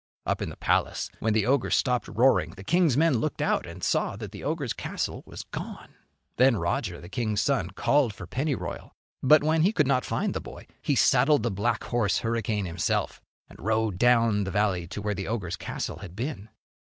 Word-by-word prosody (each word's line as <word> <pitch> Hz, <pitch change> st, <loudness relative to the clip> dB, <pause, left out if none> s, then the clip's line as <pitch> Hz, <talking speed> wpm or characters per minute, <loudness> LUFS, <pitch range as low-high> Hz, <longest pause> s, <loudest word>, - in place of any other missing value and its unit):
Up -, -, -1 dB
in -, -, -2 dB
the -, -, -10 dB
palace, -, -, 0 dB
when 110 Hz, 0 st, +1 dB
the 110 Hz, -2 st, +2 dB
ogre 130 Hz, +1 st, +2 dB
stopped 125 Hz, -2 st, +1 dB
roaring, 120 Hz, 0 st, +2 dB
the 95 Hz, -, -9 dB
king's 165 Hz, -, +3 dB
men 155 Hz, -6 st, +3 dB
looked 155 Hz, +6 st, -2 dB
out 150 Hz, -10 st, 0 dB
and 85 Hz, +1 st, -10 dB
saw -, -, +1 dB
that 105 Hz, -2 st, -7 dB
the 100 Hz, -, -9 dB
ogre's 145 Hz, -5 st, -2 dB
castle -, -, -4 dB
was -, -, -8 dB
gone. -, -, -8 dB, 0.4 s
Then 130 Hz, -1 st, +5 dB
Roger, 85 Hz, -1 st, -2 dB
the 85 Hz, -, -11 dB
king's 110 Hz, -2 st, -1 dB
son, 135 Hz, -11 st, +1 dB
called 130 Hz, +6 st, +2 dB
for 100 Hz, -, -9 dB
Pennyroyal. 140 Hz, +1 st, -3 dB, 0.3 s
But 150 Hz, +3 st, +6 dB
when 160 Hz, +1 st, +2 dB
he 185 Hz, +6 st, +4 dB
could 150 Hz, -9 st, +2 dB
not 130 Hz, -2 st, +2 dB
find -, -, -1 dB
the -, -, -3 dB
boy, -, -, -10 dB, 0.2 s
he -, -, +1 dB
saddled 145 Hz, -4 st, +4 dB
the 120 Hz, -, 0 dB
black 105 Hz, +4 st, -1 dB
horse 115 Hz, -5 st, +1 dB
Hurricane 115 Hz, -3 st, -1 dB
himself 85 Hz, -1 st, -1 dB, 0.3 s
and -, -, -16 dB
rode 110 Hz, -3 st, 0 dB
down 115 Hz, -4 st, +4 dB
the 95 Hz, -, -3 dB
valley 95 Hz, -3 st, 0 dB
to 100 Hz, +3 st, -6 dB
where 105 Hz, 0 st, 0 dB
the 95 Hz, -1 st, -5 dB
ogre's 100 Hz, -6 st, -2 dB
castle -, -, -5 dB
had 90 Hz, -, -10 dB
been. 115 Hz, -2 st, -5 dB
115 Hz, 205 wpm, -27 LUFS, 100-135 Hz, 0.4 s, But